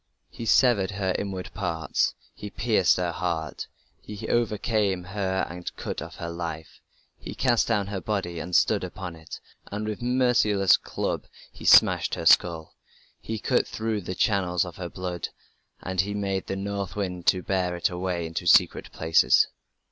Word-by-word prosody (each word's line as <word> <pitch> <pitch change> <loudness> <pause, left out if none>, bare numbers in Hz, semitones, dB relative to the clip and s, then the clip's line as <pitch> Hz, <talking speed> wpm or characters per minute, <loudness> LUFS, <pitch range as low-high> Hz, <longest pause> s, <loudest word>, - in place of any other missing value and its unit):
He 115 - -7
severed 110 -5 +4
her 95 -2 -1
inward 95 -2 -5
parts, 85 -5 -1 0.2
he 105 - -8
pierced 105 -4 +2
her 90 -1 -1
heart, 85 -3 -3 0.3
He 105 +1 -8
overcame 105 -4 0
her 95 0 -2
and 90 0 -7
cut - - -5
off - - -8
her 85 0 -5
life; 80 -2 -6 0.4
He - - -8
cast 120 -3 +2
down 105 -4 +1
her 100 -1 -5
body 95 -6 -3
and 90 +2 -4
stood - - +3
upon 90 -3 -6
it... 80 -1 -10 0.3
And 105 +1 -3
with 110 +3 -4
merciless 120 -6 +3
club - - -3 0.2
he - - -12
smashed - - +6
her 85 - -6
skull. 80 -1 +4 0.5
He 110 - -4
cut - - +1
through 110 -1 -2
the 90 0 -5
channels 95 -5 +1
of 90 - -9
her 90 -2 -5
blood, 90 -1 -5 0.5
And 95 0 0
he 100 +2 -4
made 95 -2 -2
the 95 - -2
north 100 0 -4
wind 90 -4 -4
to 90 -1 +3
bear 90 -2 -1
it 85 - 0
away 90 -1 -2
into 85 +1 -4
secret - - +4
places. 80 0 +3
95 Hz, 165 wpm, -26 LUFS, 90-105 Hz, 0.5 s, smashed